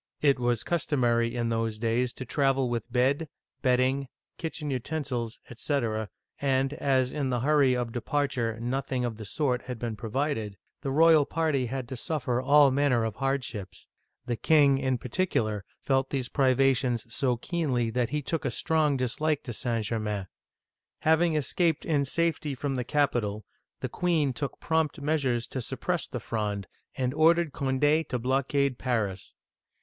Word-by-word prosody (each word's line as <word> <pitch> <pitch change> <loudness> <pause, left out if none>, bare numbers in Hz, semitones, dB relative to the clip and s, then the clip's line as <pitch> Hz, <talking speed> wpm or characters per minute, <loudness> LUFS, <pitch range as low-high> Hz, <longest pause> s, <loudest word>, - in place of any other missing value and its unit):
It 140 -3 +4
was 120 -2 +1
customary 120 -8 +1
in 120 -1 0
those 115 -1 -1
days 120 +2 0
to 130 - -7
travel 135 -1 +1
with 120 0 -3
bed, 135 +5 +1 0.3
bedding, 130 +1 +2 0.3
kitchen 160 -3 -3
utensils, 125 -3 -3
etc., 115 -4 -1 0.3
and 135 0 +1
as 130 -4 +1
in 140 -3 -1
the 120 -2 0
hurry 140 -2 +4
of 120 -2 -2
departure 120 -3 -1
nothing 125 +1 -1
of 115 -3 -4
the 110 - -7
sort 125 +3 0
had 125 -2 -5
been 115 -1 -3
provided, 110 -2 -2 0.2
the 140 - -3
royal 155 +1 +5
party 155 -6 0
had 130 0 -4
to 130 - -5
suffer 125 -2 -1
all 145 +1 +6
manner 130 -4 +2
of 110 -2 -3
hard 135 0 0
ships. 105 -6 -7 0.4
The 120 -1 -1
king, 140 +1 +4
in 130 -2 0
particular, 115 - -1 0.2
felt 135 -1 +1
these 130 -3 -2
privations 130 -3 +2
so 125 -2 +1
keenly 125 -6 -1
that 120 0 0
he 150 +2 -2
took 160 +4 -2
a 135 - 0
strong 150 +2 +1
dislike 145 +4 0
to 120 - -5
St. 115 -2 -1
Germain. 105 -3 -2 0.8
Having 160 +1 +3
escaped 160 +2 +1
in 145 -4 +1
safety 155 -1 0
from 140 +1 -2
the 125 - -1
capital, 120 -7 0 0.4
the - - -1
queen 160 -6 +1
took 140 +2 -4
prompt 160 -1 0
measures 140 -5 0
to 130 - -5
suppress - - -2
the - - -5
Fronde, 105 -3 -3 0.3
and 130 -1 -1
ordered 165 +1 +4
Cond6 145 +3 +1
to 125 - 0
blockade 135 +2 0
Paris. 105 -7 -2
130 Hz, 160 wpm, -28 LUFS, 120-145 Hz, 0.8 s, all